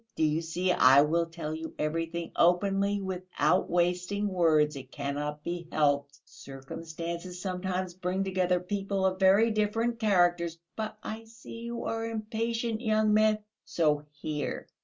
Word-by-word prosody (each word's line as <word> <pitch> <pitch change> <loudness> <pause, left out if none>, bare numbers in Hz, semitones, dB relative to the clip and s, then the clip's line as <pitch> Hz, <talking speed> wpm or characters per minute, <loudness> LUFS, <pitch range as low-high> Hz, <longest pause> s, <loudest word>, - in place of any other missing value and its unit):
Do - - 0
you 155 +1 +2
see, 175 +3 -1
I 135 -3 +7
will 165 +2 +1
tell 165 -2 -5
you 160 +1 -6
everything 165 +2 -2
openly, 195 +3 +3
without 185 -1 0
wasting 180 +4 +1
words. 155 -5 +3
It 135 -1 -9
cannot 145 +1 -4
be 175 -1 -4
helped. 145 -2 +1
Circumstances 165 +6 -7
sometimes 185 -1 -3
bring 185 +1 -2
together 185 -2 +1
people 195 +1 -2
of 190 0 0
very 200 +4 +5
different 225 +2 0
characters.... 175 -5 +2 0.2
But 215 -1 -4
I 220 +1 -6
see 230 0 -11
you 235 0 -5
are 225 0 -2
impatient, 225 +1 -2
young 215 -2 +2
man.... 215 0 +3 0.2
So 150 -3 0
here 150 0 -4
180 Hz, 140 wpm, -29 LUFS, 160-210 Hz, 0.2 s, I